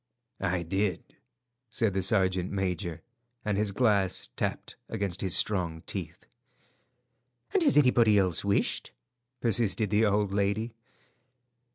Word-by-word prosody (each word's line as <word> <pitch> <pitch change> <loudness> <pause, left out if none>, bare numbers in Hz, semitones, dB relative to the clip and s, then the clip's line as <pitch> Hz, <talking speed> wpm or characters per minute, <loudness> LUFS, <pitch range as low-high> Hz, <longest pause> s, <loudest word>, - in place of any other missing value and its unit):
"I 90 -2 -1
did," 95 +3 -2 0.5
said 115 -3 0
the 95 - 0
sergeant 95 -2 +1
major, 90 -4 -3 0.4
and 105 -1 0
his 105 0 0
glass 100 -4 +1
tapped - - -3
against 100 -2 -3
his 95 -3 +2
strong 85 -6 0
teeth. - - -6 1.3
"And 390 - +3
has 285 - +4
anybody 120 -6 +5
else 95 -4 +2
wished?" 100 0 0 0.5
persisted 110 -2 +2
the 110 +1 +3
old 105 -1 +1
lady. 100 +3 0
100 Hz, 115 wpm, -28 LUFS, 95-110 Hz, 1.3 s, anybody